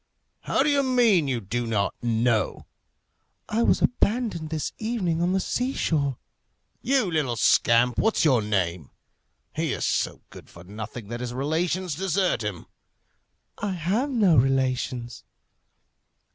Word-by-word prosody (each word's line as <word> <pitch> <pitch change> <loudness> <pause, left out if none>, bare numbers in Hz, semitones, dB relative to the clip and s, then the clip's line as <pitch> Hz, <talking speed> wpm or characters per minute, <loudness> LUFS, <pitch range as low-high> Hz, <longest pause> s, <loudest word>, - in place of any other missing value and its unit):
"How - - +1
do 300 - +2
you 280 -1 +3
mean? 240 - +3
you 130 -3 -1
don't 110 0 -1
know?" 115 -2 0 0.8
"I 220 +2 0
was - - +2
abandoned 215 -9 0
this 155 -2 -3
evening 200 -8 -1
on 175 +1 +1
the 190 - +2
sea 250 +7 -1
shore." 140 -5 0 0.6
"You 255 -7 +1
little 145 -7 0
scamp! 120 +1 +3
what's 220 -6 +2
your 130 -7 +4
name? 90 -7 -1 0.7
He - - -1
is - - -2
so - - -1
good - - -13
for 85 - -13
nothing 105 +3 -8
that 120 0 -5
his 120 0 -5
relations 165 +5 -1
desert 190 - 0
him." 105 -5 -5 0.9
"I 205 -2 -2
have 190 - -1
no 205 - +3
relations." 130 -2 0
150 Hz, 135 wpm, -25 LUFS, 120-195 Hz, 0.9 s, your